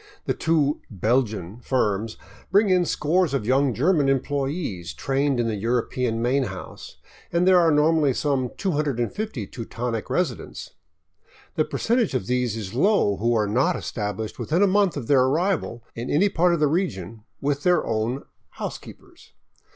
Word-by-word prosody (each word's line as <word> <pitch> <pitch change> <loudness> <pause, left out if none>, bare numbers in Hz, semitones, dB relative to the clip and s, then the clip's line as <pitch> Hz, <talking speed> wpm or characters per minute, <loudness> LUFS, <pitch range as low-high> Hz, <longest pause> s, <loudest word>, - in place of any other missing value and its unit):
The - - +1
two 155 -3 +1
" - - -41
Belgian 110 -2 -1
" - - -20
firms 110 -3 0 0.3
bring 200 +1 +4
in 180 -1 +3
scores 160 0 +1
of 115 - -2
young 135 +3 +3
German 145 - +2
employees 135 - -2
trained 135 - 0
in 120 - +1
the 115 - -1
European 115 +2 -1
main 130 +2 +2
house; 95 -4 -9 0.3
and 170 +2 +2
there 185 -1 +7
are 170 -2 +4
normally 150 -1 +3
some 135 -4 0
250 150 - -2
Teutonic 115 0 -5
residents. 165 -10 -3 0.8
The - - +1
percentage 230 - 0
of 110 - -1
these 125 -1 0
is 100 -4 -6
low 135 - +2
who 115 +4 +1
are 105 -2 +2
not 130 - +2
established 105 0 -4
within 170 +6 +1
a - - +7
month 195 -3 +2
of 135 - -4
their 135 +1 +4
arrival 150 -3 0
in 120 +2 -5
any 190 +8 +3
part 175 -1 +2
of - - -3
the 150 - +4
region 115 - -2 0.2
with 140 0 -1
their 180 +2 +2
own 115 +4 -1
'' - - -45
housekeepers." - - -9
135 Hz, 165 wpm, -24 LUFS, 115-165 Hz, 0.8 s, there